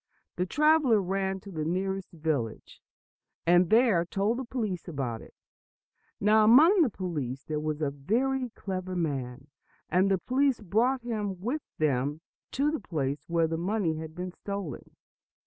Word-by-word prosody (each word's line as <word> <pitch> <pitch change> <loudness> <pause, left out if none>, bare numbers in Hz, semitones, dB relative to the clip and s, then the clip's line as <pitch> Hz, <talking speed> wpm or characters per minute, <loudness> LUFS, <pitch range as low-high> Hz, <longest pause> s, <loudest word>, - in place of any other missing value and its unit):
The 180 +1 -1
traveler 300 - +4
ran 190 0 -2
to 200 - -10
the 155 -3 -3
nearest 190 +3 -2
village, 150 - -3 0.6
and 175 0 +5
there 220 -7 +4
told 200 +7 -1
the - - -3
police 220 -9 -3
about 130 -8 -3
it. - - -15 0.8
Now, 215 +2 +5
among 310 - +7
the 295 - +4
police 145 - -4
there 155 -1 -3
was 155 0 -2
a 140 - 0
very 250 - 0
clever 185 -1 -4
man, 135 -6 -3 0.4
and 185 +4 +3
the 195 - +3
police 260 +5 +1
brought 230 +6 +1
him 210 -6 -3
with 250 +11 -2 0.2
them 145 0 0 0.3
to 285 +3 +1
the 315 - -2
place 145 - -3
where 170 -1 +2
the 165 0 -2
money 180 -3 0
had 160 0 -7
been 180 +1 -5
stolen. 200 - -6
185 Hz, 155 wpm, -28 LUFS, 155-225 Hz, 0.8 s, among